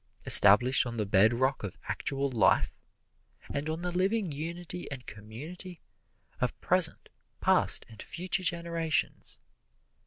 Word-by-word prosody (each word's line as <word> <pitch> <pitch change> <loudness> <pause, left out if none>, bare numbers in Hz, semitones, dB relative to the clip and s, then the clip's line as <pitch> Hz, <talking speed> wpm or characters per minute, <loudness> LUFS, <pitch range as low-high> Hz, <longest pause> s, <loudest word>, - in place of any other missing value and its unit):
Established 120 +6 +7
on 120 -1 -8
the 105 - -3
bedrock 115 +7 0
of 100 - -8
actual 140 0 -4
life, 115 -5 0 0.7
and 145 +2 -5
on 160 +2 -6
the 180 - -4
living 190 +1 -2
unity 170 +4 -8
and 130 -3 -10
community 150 - -12 0.6
of - - -4
present, - - +3 0.3
past - - 0
and 110 - -14
future 180 0 -5
generations. 170 -3 -3
145 Hz, 120 wpm, -27 LUFS, 120-175 Hz, 0.7 s, Established